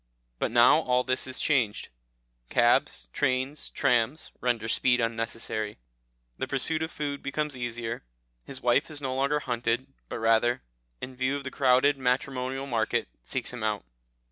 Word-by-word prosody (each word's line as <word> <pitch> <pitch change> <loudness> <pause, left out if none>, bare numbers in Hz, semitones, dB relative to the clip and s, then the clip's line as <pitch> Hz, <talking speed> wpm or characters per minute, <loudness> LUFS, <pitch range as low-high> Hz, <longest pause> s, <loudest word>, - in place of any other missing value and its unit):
But - - +1
now - - +6
all 125 0 +2
this 130 +1 0
is 130 - -2
changed. 125 -9 +1 0.6
Cabs, - - +3
trains, 130 +1 0
trams, 130 +3 +1
render 120 -3 0
speed 125 +2 +3
unnecessary, 115 -2 -2 0.6
the - - -1
pursuit 155 +4 0
of 160 - -1
food 145 -3 -4
becomes 150 +1 -2
easier; 120 - -4 0.4
his - - -6
wife - - +3
is 150 -2 -4
no 135 -2 -2
longer 140 +2 +1
hunted, 120 +1 -1 0.2
but - - -4
rather, 115 - +2 0.4
in 130 0 -6
view 130 +2 0
of 140 - -4
the 130 - -5
crowded 135 +1 +4
matrimonial 130 +1 -1
market, 115 -5 0
seeks 60 - -3
him 125 - -6
out. 105 - -1
130 Hz, 150 wpm, -28 LUFS, 115-140 Hz, 0.6 s, now